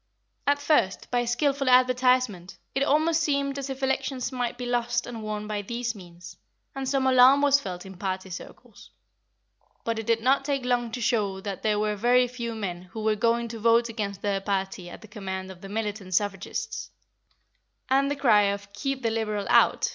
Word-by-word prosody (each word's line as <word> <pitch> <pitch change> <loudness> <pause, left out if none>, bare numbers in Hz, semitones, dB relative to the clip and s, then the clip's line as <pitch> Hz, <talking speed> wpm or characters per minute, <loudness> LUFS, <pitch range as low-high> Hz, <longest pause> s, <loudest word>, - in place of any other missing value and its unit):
At 285 0 +4
first, 285 -10 +1
by 245 -1 +1
skilful 275 +2 +1
advertisement, 250 -6 +3 0.2
it 270 - -1
almost 310 +3 +3
seemed 280 -2 0
as 275 0 -5
if 270 0 -5
elections 265 -1 -1
might 245 -2 -2
be 250 - -5
lost 240 0 0
and 235 -2 -7
won 210 -1 -4
by 210 -1 -3
these 235 +3 -3
means, 180 -2 -12 0.4
and 270 -1 -3
some 270 -1 +1
alarm 260 +2 +6
was 285 0 +5
felt 180 -6 -6
in 190 -1 -10
party 190 0 -4
circles; 180 - -11 0.9
but 230 -1 -2
it 225 - -6
did 230 -1 +3
not 265 +3 +3
take 275 -2 -2
long 240 -2 0
to 245 - -4
show 210 -5 0
that 195 -1 -5
there 215 -1 +1
were 210 0 0
very 245 +4 +3
few 235 -2 -5
men 185 -5 -4
who 220 - -5
were 220 0 +3
going 235 +2 +1
to 225 0 -7
vote 230 +1 +3
against 205 -4 -4
their 200 -1 0
party 195 -2 -3
at - - -11
the 220 - -12
command 190 -2 -6
of 180 -2 -13
the 195 - -9
militant 205 -3 -3
suffragists, 200 -1 -2 1.0
and 275 +1 +3
the 285 - -1
cry 225 -7 +4
of 200 0 -5
"Keep 270 +4 -3
the 230 - +1
Liberal 215 -2 -2
out!" - - +4
230 Hz, 195 wpm, -26 LUFS, 205-255 Hz, 1.0 s, alarm